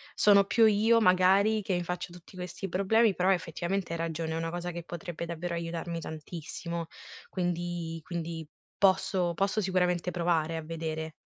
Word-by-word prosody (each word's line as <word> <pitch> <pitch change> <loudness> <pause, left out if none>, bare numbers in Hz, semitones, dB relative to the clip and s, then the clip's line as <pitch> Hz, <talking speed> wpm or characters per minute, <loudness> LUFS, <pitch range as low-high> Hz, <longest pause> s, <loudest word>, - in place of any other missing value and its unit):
sono 200 -1 +6
più 225 +2 +4
io 220 +2 +5
magari 195 +3 +4
che 190 -2 -1
mi 175 - -1
faccio 180 0 -4
tutti 175 +1 -14
questi 180 +1 -5
problemi, 200 +4 +3
però 185 +1 +2
effettivamente 175 +1 -1
hai 165 - -3
ragione, 165 -1 -2
è - - -2
una 165 0 -2
cosa 175 +1 -4
che 170 0 -6
potrebbe 175 -1 -6
davvero 170 +1 -4
aiutarmi 170 0 -3
tantissimo, 165 +1 -6 0.4
quindi 175 -2 -2
quindi, 165 -2 -5 0.3
posso 190 -2 +3
posso 200 +4 +1
sicuramente 180 -2 +1
provare 165 -2 0
a - - -3
vedere. 160 0 -4
175 Hz, 160 wpm, -29 LUFS, 165-190 Hz, 0.4 s, sono